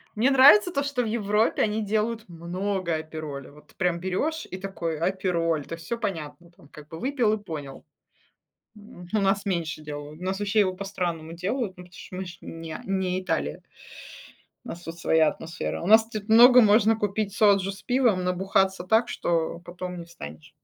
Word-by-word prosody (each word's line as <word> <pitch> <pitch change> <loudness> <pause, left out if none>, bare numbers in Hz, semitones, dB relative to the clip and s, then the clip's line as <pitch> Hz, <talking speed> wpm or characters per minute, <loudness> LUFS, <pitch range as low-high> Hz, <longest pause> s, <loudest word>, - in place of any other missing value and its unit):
Мне 240 +6 +3
нравится 290 +9 +7
то, 280 - 0
что 280 -3 -1
в - - -3
Европе 215 0 +1
они 215 0 0
делают 220 +2 -1
много 175 +1 -3
апероля, 155 -4 -6
вот 150 +1 -18
ты - - -24
прям 175 -2 0
берешь 195 - -2
и - - -6
такой 185 -4 -4
апероль, 170 -3 0
то - - -8
есть 165 0 -13
всё 235 - -3
понятно 170 -5 -5
там 160 -4 -21
как 150 -1 -13
бы, 160 +1 -9
выпил 250 -4 +1
и 215 -1 -4
понял. 145 -7 -7 0.9
М, 210 -4 -13
у 215 - +3
нас 195 +1 +1
меньше 170 -5 -2
делают, 150 +1 -8
у - - -9
нас 190 +1 -2
вообще 205 +1 +2
его 185 -2 +1
по-странному 175 -4 -4
делают, 190 +3 -3
ну, 180 - -11
потому 180 - -21
что 185 - -10
мы 190 +1 -4
же 175 -1 -10
не 165 -1 -7
не 190 -1 -1
Италия 75 - -2 1.0
у - - -8
нас 170 - -7
тут 165 -1 -8
своя 160 -1 +3
атмосфера, 165 +2 -4
у - - -4
нас 220 +3 +6
тут 215 -2 -6
много 240 +3 +8
можно 220 0 +5
купить 205 -1 -2
соджу 200 -2 +4
с 195 +1 -12
пивом, 245 -7 +2
набухаться 190 +1 +1
так, 220 +5 +2
что 165 -1 -1
потом 180 +1 -7
не 170 - -8
встанешь. 80 - -11
185 Hz, 190 wpm, -26 LUFS, 165-215 Hz, 1.0 s, много